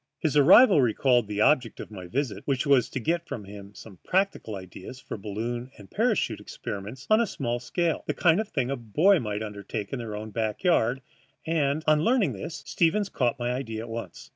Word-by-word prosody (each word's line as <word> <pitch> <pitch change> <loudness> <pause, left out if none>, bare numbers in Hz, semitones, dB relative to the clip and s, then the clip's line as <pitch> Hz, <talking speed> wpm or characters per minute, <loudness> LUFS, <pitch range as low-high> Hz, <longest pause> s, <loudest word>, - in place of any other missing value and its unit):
His 155 -3 -1
arrival 175 - +7
recalled 120 -1 +2
the 105 0 -2
object 125 -3 +2
of - - -8
my 95 -4 -8
visit, 120 -2 -2
which 135 -1 0
was 135 -5 +3
to - - -4
get 170 +7 -1
from 125 -7 -6
him 100 0 -11
some 100 -5 -12
practical 185 - 0
ideas 95 +6 -9
for - - -7
balloon 115 +5 -4
and 100 -3 -14
parachute - - 0
experiments 105 +8 -7
on 215 +2 +6
a 235 - +1
small 120 -8 -3
scale, 170 +6 -1
the - - -1
sort 170 +1 +4
of 220 - -2
thing 130 -5 -1
boys 150 - +3
might 105 -1 -3
undertake 105 +1 -6
in 135 - -2
their 110 -3 -5
own 110 +1 -6
backyards; 115 - +1 0.4
and, 155 -2 0
on 155 -1 +4
learning 235 -1 +2
this, 155 -4 -7
Stevens 190 +4 +1
caught 125 -1 0
my 120 -1 -2
idea 115 -4 -4
at 115 - -9
once. 115 +1 -7
125 Hz, 195 wpm, -26 LUFS, 110-155 Hz, 0.4 s, arrival